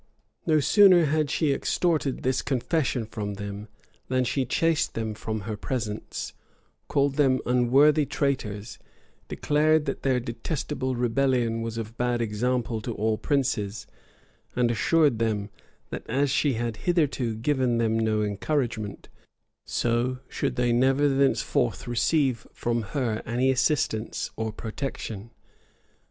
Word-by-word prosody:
No 155 -2 +4
sooner 185 +2 +6
had 155 0 +1
she 150 -1 +1
extorted 155 -2 0
this 130 +1 +1
confession 130 -2 0
from 105 -2 -5
them, 100 +1 -6 0.4
than 130 0 +1
she 130 +2 0
chased 165 +4 +1
them 110 -1 -2
from 110 0 -4
her 105 +1 -4
presence, 110 -1 -4 0.5
called 140 -1 +1
them 135 -3 +3
unworthy 135 +5 +4
traitors, 115 -7 -2 0.5
declared 155 +1 +2
that 135 - -3
their 130 -2 +2
detestable 130 +2 -3
rebellion 120 -1 +1
was 115 0 -4
of 115 0 -6
bad 120 0 +1
example 115 +1 -1
to 115 +1 -4
all 110 +1 +1
princes; 120 -8 -1 0.7
and 120 -1 +2
assured 145 0 +3
them, 105 -2 -1 0.4
that - - -4
as 135 +3 +1
she 140 +1 +2
had 115 -1 -3
hitherto 140 -8 0
given 125 0 +1
them 115 -1 +1
no 110 -1 +1
encouragement, 110 0 -2 0.6
so 120 +2 0
should - - -2
they 120 -1 +2
never 135 +4 +3
thenceforth 135 - +1
receive 125 +1 +1
from 120 0 -1 0.2
her 115 -5 0
any 125 +3 +2
assistance 130 -4 0
or 110 0 -2
protection. 110 -2 -5
125 Hz, 130 wpm, -26 LUFS, 110-140 Hz, 0.7 s, sooner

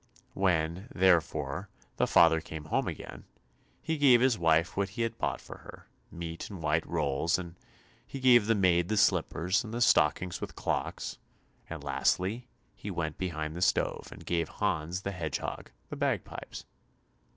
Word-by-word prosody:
When, 90 +1 0
therefore, 90 -3 +2 0.3
the - - +2
father 80 -1 +5
came 80 -1 -8
home 80 - 0
again, - - -7 0.6
he 160 -1 -2
gave 130 -4 +7
his 130 -1 +3
wife 80 -2 +2
what 100 0 0
he 110 +4 -3
had 115 0 -3
bought - - -1
for - - -11
her; - - -13 0.2
meat 85 -1 -6
and 100 -4 -8
white 80 +1 +1
rolls, 75 +6 0
and 85 -2 -7
then - - -32 0.4
he 135 - -7
gave 120 -4 +5
the 115 - +3
maid 90 -3 +3
the 110 - 0
slippers, 95 +2 +2
and 110 - -8
the 120 - -3
stockings 90 -5 +3
with - - -6
clocks; - - -3 0.5
and, - - -7
lastly, 110 +7 0 0.3
he 105 - -8
went 85 -4 -3
behind 80 -4 -3
the 90 - -5
stove, 95 - +1
and - - -12
gave 85 -2 -1
Hans 80 +4 -2
the 100 - -2
Hedgehog 80 -6 -4 0.2
the - - -3
bagpipes. - - -3
90 Hz, 165 wpm, -30 LUFS, 80-105 Hz, 0.6 s, gave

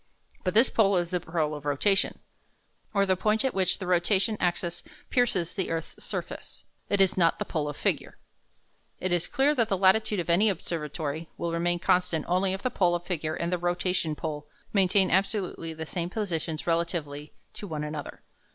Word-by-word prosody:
But 185 0 -1
this 230 +4 +5
pole 200 -4 +4
is 175 0 -1
the 180 - +1
pole 160 -3 -1
of 150 -1 -7
rotation, 170 +8 +2 0.7
or 200 -2 +3
the 190 -1 +2
point 215 +6 +1
at 265 - +1
which 185 -2 +2
the 190 - -6
rotation 190 +4 +2
axis 175 -1 -1 0.3
pierces 200 -9 +1
the 190 - -2
earth's 165 -1 -4
surface. - - -5 0.3
It 200 - +1
is 190 -1 +4
not 170 -1 +4
the - - -3
pole 150 -2 -2
of 145 - -7
figure. - - -1 0.8
It 185 - -2
is 175 -1 +1
clear 280 +3 +2
that 235 -6 +1
the 195 - +1
latitude 200 +2 +3
of 175 - -3
any 185 +6 +4
observatory 160 -3 -3
will 170 -1 -2
remain 175 +1 +1
constant 175 -2 +1
only 185 +2 +2
if 195 - -5
the 255 - 0
pole 175 -2 +2
of 175 - -3
figure 160 -4 -2
and 170 +1 -2
the 180 - 0
rotation 175 -2 0
pole 150 -1 -5 0.3
maintain 190 -1 +3
absolutely 190 -3 0
the 160 0 -6
same 170 +3 -3
positions 170 -6 -2
relatively 165 -4 -2 0.3
one 160 -7 -4
to 150 - -4
the - - -5
other. 145 - -7
175 Hz, 190 wpm, -28 LUFS, 165-195 Hz, 0.8 s, this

